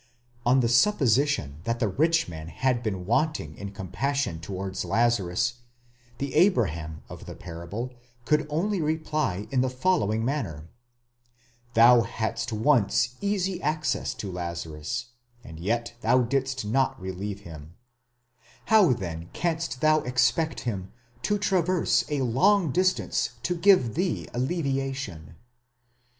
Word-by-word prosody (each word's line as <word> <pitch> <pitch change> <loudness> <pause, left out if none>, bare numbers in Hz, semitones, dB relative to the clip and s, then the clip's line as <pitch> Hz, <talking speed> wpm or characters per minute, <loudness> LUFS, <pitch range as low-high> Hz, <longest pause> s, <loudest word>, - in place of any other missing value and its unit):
On 130 +2 +5
the 120 - +2
supposition 130 - +2
that 115 0 -1
the 115 - +2
rich 160 - +2
man 80 -2 -8
had 125 +6 0
been 95 -6 -3
wanting 115 - 0
in 100 +2 -7
compassion 100 +1 -2
towards 95 +2 -4
Lazarus, 115 0 +1 0.6
the 140 -2 -4
Abraham 85 - +1
of - - -10
the - - -7
parable 90 +9 -6 0.3
could 150 +1 +2
only 180 +5 0
reply 155 - -1
in 130 -2 +2
the 130 - +1
following 125 - +1
man 140 -1 0
ner: 80 -2 -10 1.1
"Thou 120 +1 +7
hadst 115 +1 -3
once 120 0 +2
easy 195 -3 -1
access 155 0 -1
to 100 - -5
Lazarus, 85 +4 -4 0.3
and 80 -1 -10
yet 115 +6 -1
thou 125 +3 +4
didst 135 0 -1
not 130 +5 +1
relieve 95 +2 -5
him; 80 -2 -11 1.0
how 200 -11 +7
then 85 -5 -6
canst 165 -5 -2
thou 155 0 +5
expect 130 +5 +1
him 100 -6 -4 0.3
to 205 +7 +1
traverse 185 -3 +2
a 145 -3 0
long 170 - +3
distance 185 -5 +1
to 180 - 0
give 170 - +4
thee 180 +3 -1
alleviation?" 135 - -2
120 Hz, 130 wpm, -26 LUFS, 95-155 Hz, 1.1 s, Thou